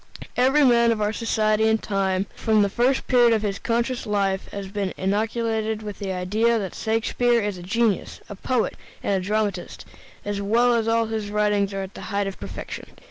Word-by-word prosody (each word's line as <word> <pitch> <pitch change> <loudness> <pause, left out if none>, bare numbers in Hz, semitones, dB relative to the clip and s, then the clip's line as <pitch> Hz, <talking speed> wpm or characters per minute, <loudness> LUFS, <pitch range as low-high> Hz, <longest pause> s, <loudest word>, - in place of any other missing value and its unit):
Every 265 +4 +4
man 235 -2 +5
of 225 - -1
our 210 0 0
society 220 -1 +1
and 220 0 +2
time, 195 -2 0
from 215 -2 +2
the 200 - 0
first 250 +5 +1
period 240 -2 +5
of 220 -1 0
his 200 -1 -2
conscious 240 0 -1
life, 195 -2 0
has 200 -1 -6
been 200 -1 -3
inoculated 220 +2 -1
with 210 -2 -7
the 195 -2 -3
idea 210 +6 +1
that 195 -4 -4
Shakespeare 235 +2 +1
is 205 -4 -3
a - - -9
genius, 215 +2 0
a - - -7
poet, 235 +4 -1 0.3
and 200 - 0
a 190 -1 0
dramatist, 205 -2 -2 0.4
and 205 0 -2
that 230 +3 +2
all 230 0 +2
his 220 -2 -3
writings 205 -1 +1
are 195 -1 -3
the 190 - -11
height 200 -1 0
of 195 -1 -6
perfection. - - -7
215 Hz, 190 wpm, -24 LUFS, 200-230 Hz, 0.4 s, man